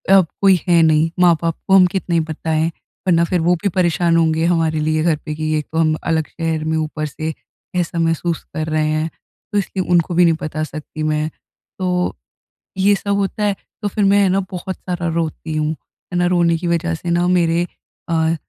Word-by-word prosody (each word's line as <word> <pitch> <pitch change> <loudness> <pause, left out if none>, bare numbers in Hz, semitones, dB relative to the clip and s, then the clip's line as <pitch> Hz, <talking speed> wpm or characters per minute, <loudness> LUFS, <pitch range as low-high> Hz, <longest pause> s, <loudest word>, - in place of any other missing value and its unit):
अब 190 -3 +5
कोई 195 -2 +5
है 170 -2 +5
नहीं। 160 0 +3
माँ-बाप 170 -2 +3
को 190 - +5
हम 185 -1 +8
कितनी 180 -3 0
बताएँ, 160 0 -1 0.4
वरना 170 -2 +4
फिर 180 - +1
वो 175 +2 +3
भी 200 - +2
परेशान 170 -1 +2
होंगे 160 0 +2
हमारे 165 -2 +1
लिए 155 +1 +1
घर 165 -2 +3
पे 155 -1 -4
कि 155 0 -2
एक 150 - -3
तो 160 - -3
हम 155 -1 +3 0.2
अलग 160 -1 +1
शहर 165 -2 -2
में 160 0 0
ऊपर 155 -1 -2
से 155 +2 -4 0.4
ऐसा 175 -1 -1
महसूस 165 0 0
कर 155 +1 -3
रहे 155 -1 +1
हैं। 155 +1 0 0.4
तो 205 - 0
इसलिए 190 -1 -1
उनको 175 0 +3
भी 180 +1 +5
नहीं 165 -1 +4
बता 155 0 -3
सकती 155 0 -6
मैं। 155 0 0 0.5
तो 185 - -1 0.9
ये 200 +2 +4
सब 200 +1 -1
होता 200 +1 -1
है 205 -1 +1 0.3
तो 210 - -1
फिर 205 +1 -1
मैं 200 +1 +5
है 195 - +3
ना 190 +2 +2
बहुत 185 0 -4
सारा 175 -2 -3
रोती 160 -1 -3
हूँ। 155 0 0
है 175 +3 -10
ना, 175 - +2
रोने 170 -2 +2
की 175 +2 -4
वज़ह 170 0 0
से 170 +2 -6
ना 175 +1 +2
मेरे 175 -1 +2 0.4
अ, 165 0 +2
165 Hz, 210 wpm, -19 LUFS, 155-180 Hz, 0.9 s, हम